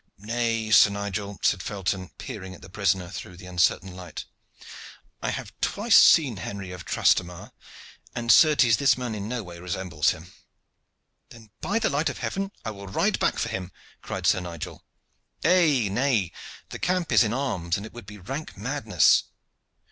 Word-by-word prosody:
"Nay, 115 +1 -2
Sir 110 - +8
Nigel," 100 0 -4
said 95 - +2
Felton, 95 -2 -3
peering 95 0 -7
at - - -16
the 85 - -12
prisoner 95 -3 0
through 90 -2 -8
the 95 - -12
uncertain 90 +1 +1
light, 90 -4 -8 1.0
"I - - -1
have - - -5
twice - - +2
seen 135 -10 +6
Henry 95 0 -6
of 90 -1 -9
Transtamare, 90 -1 +1 0.6
and 120 -1 +1
certes 145 -8 +6
this 140 -2 +3
man 125 -3 -4
in 105 -1 -5
no 125 -2 -3
way 85 -2 -10
resembles 85 -3 -1
him." 90 +1 -5 1.0
"Then, 110 -3 -15
by 205 +4 0
the 225 - +1
light 145 +3 +1
of - - -6
heaven! 195 0 -3
I 110 - -2
will 100 -1 -10
ride 95 - 0
back - - +1
for - - -1
him," 95 -1 -5 0.3
cried - - -5
Sir - - +4
Nigel. 85 -3 -7 0.6
"Nay, 155 - +4
nay, 110 -3 +1 0.4
the - - -7
camp 180 -1 0
is - - +6
in 110 - -1
arms, 115 -10 -1
and 100 - -7
it - - -11
would 120 -4 -11
be 105 0 -10
rank 135 - -7
madness. 110 - +3
100 Hz, 170 wpm, -25 LUFS, 90-120 Hz, 1.0 s, Sir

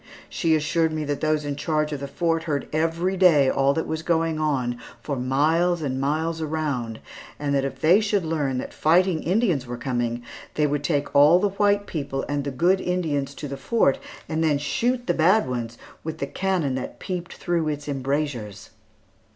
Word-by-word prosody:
She 165 -2 +1
assured 160 +1 +1
me 155 -1 -2
that 145 -1 -3
those 155 -1 +1
in 145 -1 -2
charge 155 0 -1
of 145 - -3
the 140 - -5
Fort 165 +2 -1
heard 145 -4 -2
every 165 +4 0
day 165 -8 +5
all 135 0 +3
that 160 - -1
was 160 0 -3
going 165 -1 0
on 130 -6 0 0.2
for 145 - -4
miles 155 +7 +1
and 130 -2 -2
miles 160 +3 -1
around, 145 -8 -2 0.4
and 145 -1 -2
that 135 -1 +1
if 135 -1 -5
they 175 +6 +6
should 205 -4 0
learn 145 -5 -1
that - - -5
fighting 170 +1 +3
Indians 180 - +1
were 120 0 -5
coming, 120 -2 -2 0.3
they 150 - +2
would 145 0 -1
take 145 -3 -1
all 145 +4 +7
the 205 +3 +1
white 205 +1 +2
people 140 -6 -3
and 145 -1 -1
the - - -1
good 175 +8 +2
Indians 155 -6 -1
into 145 - -6
the 140 0 -5
fort, 220 - +2 0.3
and 160 0 -1
then 150 -3 +3
shoot 240 - -1
the 175 - +1
bad 175 +3 +3
ones 120 -2 -4 0.3
with 160 0 -5
the 140 - -2
cannon 175 -2 -1
that 130 - -5
peeped 175 -2 -5
through 170 -3 -1
its 150 -1 -3
embrasures. 135 -7 -3
155 Hz, 190 wpm, -24 LUFS, 140-170 Hz, 0.4 s, all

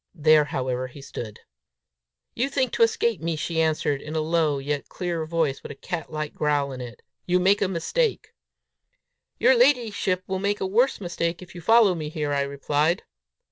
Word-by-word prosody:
There, 155 -1 +5
however, 130 -2 -2
he 130 +3 -13
stood. 115 -5 -8 0.9
"You 260 +4 -1
think 260 -3 0
to - - -3
escape 230 -4 +2
me," 165 0 -1
she 160 +1 -1
answered, 150 -3 0
in 155 +1 -7
a - - +1
low, 155 -2 +1
yet 140 +1 -3
clear 170 -3 -3
voice, 160 -4 0
with - - -8
a - - -8
cat 165 +3 -5
like 155 -1 -4
growl 145 -2 0
in 130 -1 -7
it. 120 -1 -9 0.2
"You 180 0 +3
make 195 +3 +3
a 200 - +3
mistake!" 300 - -1 1.0
"Your 260 - +5
ladyship 235 -8 +2
will 190 0 -3
make 200 +1 -1
a - - -1
worse 235 +8 +2
mistake 170 -1 -2
if 180 - -14
you 175 - -9
follow 220 +1 +5
me 155 -3 -4
here," 150 -2 -2
I 140 - +1
replied. 145 +4 0
165 Hz, 185 wpm, -25 LUFS, 145-190 Hz, 1.0 s, There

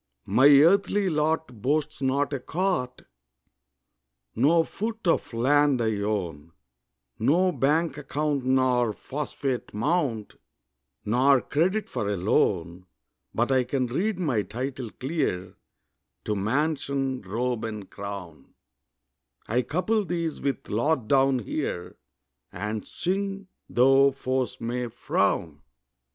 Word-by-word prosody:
My 130 +9 +5
earthly 190 +6 +5
lot 150 -6 -1
boasts 150 +4 -1
not 140 +2 +1
a 140 - -1
cot, 165 -3 -2 1.3
No 160 +7 +4
foot 220 +5 -5
of 170 - +1
land 140 +3 +3
I 110 -2 0
own, 85 -7 -3 0.7
No 170 +11 +3
bank 150 +1 +1
account 145 -1 -1
nor 130 -3 +2
phosphate 135 -4 -4
mount, 125 -4 -1 0.7
Nor 130 +5 +4
credit 185 +8 0
for 100 - -3
a 100 - -1
loan; 90 -1 0 0.5
But 120 +4 +1
I 130 -1 +4
can 130 +1 -1
read 180 - -1
my 145 - 0
title 125 +4 -5
clear 130 - -3 0.7
To 105 - -1
mansion, 135 +3 -1
robe, 115 +4 -2
and 105 -3 -5
crown; 100 -8 -8 0.9
I 120 +4 +1
couple 185 - 0
these 170 -4 -3
with 140 -4 -2
lot 120 +3 0
down 135 0 +4
here, 90 - -4 0.6
And 105 +3 -4
sing, 195 +1 -3 0.2
tho' 135 +2 +5
foes 130 -1 -2
may 120 +1 -2
frown. 85 -9 -1
130 Hz, 110 wpm, -26 LUFS, 110-155 Hz, 1.3 s, My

